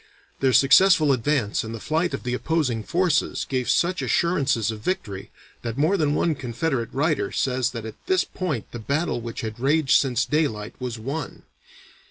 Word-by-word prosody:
Their 135 -1 +3
successful 155 +4 +5
advance 130 -3 0
and 110 +1 -6
the - - -7
flight 155 +4 0
of - - -9
the 125 - -2
opposing 130 -4 0
forces 170 - 0
gave 130 -3 -2
such 180 +2 +2
assurances 135 - +1
of 110 - -7
victory 105 - -4 0.3
that 115 0 -5
more 155 +7 +3
than 150 -5 +1
one 165 - +1
Confederate 130 -1 -2
writer 150 +1 0
says 130 -2 0
that 115 -4 -7
at 110 -1 -10
this 375 0 +3
point 155 - -4
the 120 - -6
battle 140 +2 -1
which 115 -1 -6
had 110 0 -6
raged 140 +2 +3
since 125 -3 0
daylight 115 -9 -1
was 125 -2 -4
won. 135 +6 -5
135 Hz, 175 wpm, -24 LUFS, 115-160 Hz, 0.3 s, successful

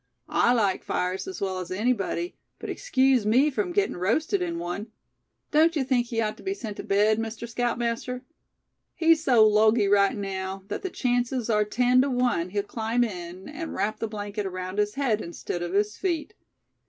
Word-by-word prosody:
"I 240 - +4
like 205 -6 +1
fires 180 - -2
as 380 - -6
well 190 -1 -1
as 180 - -6
anybody, 235 - -1 0.2
but - - -5
excuse 265 - +2
me 255 +8 +4
from 360 +6 -1
getting 405 +3 +1
roasted 200 - 0
in 170 -1 -2
one. 175 +5 -4 0.6
Don't 320 +2 +4
you 290 - +1
think 250 -2 +1
he 230 -1 -2
ought 215 -1 -2
to - - -13
be 390 0 -2
sent 220 - -6
to - - -5
bed, 210 +2 +3
Mr. 225 +1 -4
Scoutmaster? 240 +1 -2 0.7
He's 325 -1 +4
so 235 -7 +6
logy 215 0 +4
right 200 +4 +3
now, 190 -1 -4
that - - -3
the 380 - -3
chances 245 -4 0
are 210 -1 +3
ten 250 +4 +3
to 280 - +1
one 245 -9 +1
he'll 205 +2 -1
climb 225 +3 0
in, 180 -4 -6
and 310 +2 -6
wrap 215 +1 -1
the 225 - -2
blanket 205 -1 -4
around 185 +1 -4
his 210 0 0
head 250 -7 +1
instead 170 0 -5
of 175 +1 -4
his 210 +2 +1
feet. 355 +1 -2
225 Hz, 190 wpm, -26 LUFS, 200-255 Hz, 0.7 s, so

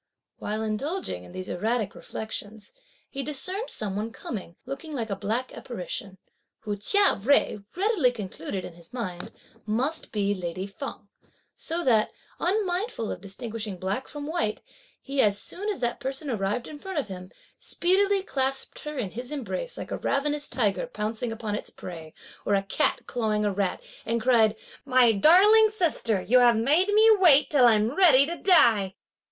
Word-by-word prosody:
While 215 +1 -3
indulging 220 - -2
in 90 - -13
these 185 - -6
erratic 220 +2 -1
reflections, 220 -1 -7 0.4
he 275 - -4
discerned 365 - -1
some 200 -3 -3
one 215 +3 -3
coming, 190 -7 -7
looking 285 +3 -6
like 225 -5 -3
a - - 0
black 230 +6 -2
apparition, 195 -4 -6 0.4
who 210 -2 -3
Chia 400 - +3
Jui 235 -5 +2
readily 375 - +2
concluded, 190 -4 -6
in 175 - -9
his 170 +3 -13
mind, 185 -7 -5 0.4
must 260 +9 -1
be 205 -2 0
lady 185 0 -4
Feng; 205 +8 -7 0.5
so 340 +2 -3
that, 225 -6 +3 0.3
unmindful 375 - -1
of - - -6
distinguishing 210 0 -5
black 195 +8 -3
from 295 -1 -7
white, 295 -9 -2 0.4
he 275 0 0
as 205 -1 +3
soon 405 - -4
as 405 - -3
that 240 -1 -1
person 270 +1 -3
arrived 210 +2 -2
in 295 - -9
front 380 +2 -6
of 290 - -1
him, 185 -2 -8 0.3
speedily 390 +2 +2
clasped 270 -4 -1
her 300 -1 -6
in 210 -8 -3
his 245 +4 -7
embrace, 300 - -4
like - - -7
a - - -3
ravenous 290 +1 0
tiger 230 - 0
pouncing 225 - -3
upon 225 -2 -4
its 210 - -3
prey, 165 -3 -9 0.3
or 205 - +2
a 195 - +1
cat 195 - 0
clawing 215 -3 -1
a 205 - 0
rat, 190 -2 -2 0.2
and 230 +1 0
cried: 225 -2 +4 0.3
"My 255 -4 +5
darling 390 - +6
sister, 330 - +1
you 250 +2 +4
have 240 -2 +5
made 295 - +3
me 425 +2 +5
wait 300 -6 +5
till 265 -5 +6
I'm 220 +1 +3
ready 300 -8 +6
to 340 +3 -4
die." 220 - +4
240 Hz, 170 wpm, -26 LUFS, 205-300 Hz, 0.5 s, darling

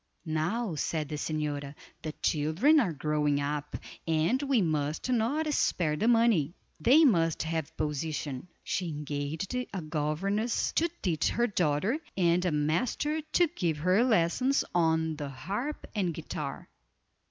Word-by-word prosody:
"Now," 170 +7 -1
said 155 0 -2
the 150 - -3
señora, 150 -2 -3 0.3
"the 155 -1 -5
children 165 - +3
are 200 -11 +1
growing 150 -1 0
up, 145 0 -3 0.3
and 165 - +2
we 275 -4 +2
must 155 - -1
not 285 +7 +1
spare 155 - +1
the 190 +9 0
money—they 230 - +3
must 165 - +3
have 160 -1 -3
position." 150 -1 -3 0.2
She 180 -2 -2
engaged 150 - -4
a 250 -7 -3
governess 170 +9 -1
to 335 +2 +1
teach 160 -5 +1
her 235 - +1
daughter, 190 - +1 0.2
and 175 -1 +3
a 180 - +2
master 215 - 0
to 310 +3 +2
give 165 -4 0
her 185 +8 +3
lessons 250 +5 +2
on 160 -2 +2
the 145 -2 -4
harp 205 - -4
and 185 -7 -1
guitar. 150 -3 -5
165 Hz, 135 wpm, -29 LUFS, 150-225 Hz, 0.3 s, children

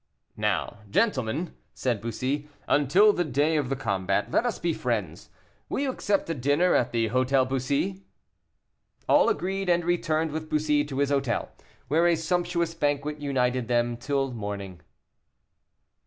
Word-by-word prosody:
"Now, - - -1
gentlemen," 155 - 0 0.2
said 120 -5 -1
Bussy, 130 +6 -3 0.2
"until 180 +10 +5
the 175 - 0
day 150 +2 +1
of 145 -5 0
the 135 - 0
combat, 100 -5 -1
let 245 - +2
us 240 - -2
be 170 -1 -1
friends. 105 - -3 0.4
Will - - -1
you 275 -2 0
accept 200 -5 0
a 165 - -1
dinner 145 +6 +2
at 125 0 +2
the 115 -1 0
Hôtel 130 +2 +2
Bussy?" 140 +9 -1 1.1
All - - +5
agreed, 190 +3 -1
and 175 -1 +2
returned 160 -2 0
with 155 +1 -5
Bussy 150 -1 +2
to 140 -2 -6
his 140 0 +1
hotel, 135 -4 0 0.4
where 160 +6 +3
a 170 - +4
sumptuous 170 0 -1
banquet 150 -1 -1
united 130 -3 0
them 120 0 +1
till 135 +2 -1
morning. 100 -6 -6
145 Hz, 150 wpm, -26 LUFS, 125-165 Hz, 1.1 s, until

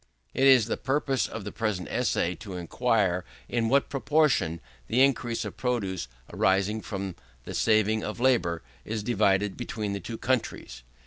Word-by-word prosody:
It 135 - +3
is 130 -5 +7
the 115 - -2
purpose 135 -2 0
of 115 - -6
the 105 - -5
present 105 -5 -2
essay 85 - 0
to 100 -5 -8
inquire, 95 0 +1 0.2
in 115 -2 0
what 140 +2 +3
proportion 140 - +1 0.3
the 125 +4 +4
increase 120 -4 +1
of - - -7
produce, 100 - -1 0.3
arising 100 +3 +2
from 100 -4 -5 0.3
the - - -7
saving 110 0 +2
of 105 - -5
labour, 120 -10 +2 0.2
is 110 -1 -4
divided 100 -3 +2
between 110 -4 -4
the 100 - -3
two 115 +5 -6
countries. 120 - -2
110 Hz, 155 wpm, -27 LUFS, 95-125 Hz, 0.3 s, is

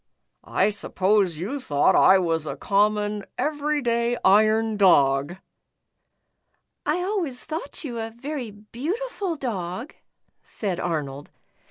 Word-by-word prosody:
I 195 - +1
suppose 195 -3 +1
you 215 - -4
thought 145 - +2
I 190 - +7
was 165 -4 -1
a 140 - -3
common, 210 +4 +1
every 295 -1 -1
day 235 0 +1
iron 215 +2 +4
dog?" 145 -6 +4 0.7
*' - - -54 0.7
I 300 - +2
always 360 -10 -2
thought 310 -1 -6
you 240 -6 -5
a 225 0 -3
very 255 +2 -6
beautiful 330 - -4
dog," 225 - -4 0.5
said 190 -5 -4
Arnold. 145 -5 -3
215 Hz, 120 wpm, -24 LUFS, 185-275 Hz, 0.7 s, I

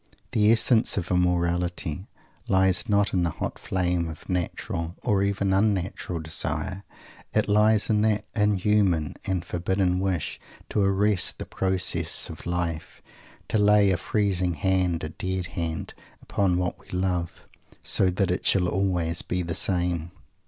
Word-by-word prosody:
The 105 0 +4
essence 115 0 +3
of 95 -2 -2
immorality 90 -1 0 0.4
lies 95 +3 +2
not 105 0 +2
in 90 - +2
the 85 - +1
hot - - -5
flame 90 -2 -1
of 80 - -10
natural, 85 -1 -3
or 100 -2 +2
even 100 -1 +1
unnatural, 95 -3 0
desire. 95 +4 -2 0.5
It - - +2
lies 105 +1 +3
in 105 -1 +2
that 105 -1 +1
inhuman 105 -6 +2
and 90 -2 -1
forbidden 90 +1 0
wish 95 -4 -2 0.3
to 105 - 0
arrest 100 0 +2
the - - -6
processes 90 -3 -1
of - - -10
life 85 -2 -3 0.5
to 110 - +1
lay 105 -1 +5
a 90 - +2
freezing 95 -5 0
hand 90 +1 +1
a 80 - -3
dead 95 +2 -3
hand 80 -2 -3 0.3
upon 95 -3 0
what 90 -1 -2
we - - -21
love, 90 -2 -2 0.4
so 95 - +2
that 90 0 0
it 90 - -1
_shall 90 -2 +3
always 90 -3 0
be 90 0 -2
the 85 -1 -3
same. 90 -3 0
95 Hz, 145 wpm, -26 LUFS, 85-100 Hz, 0.5 s, lay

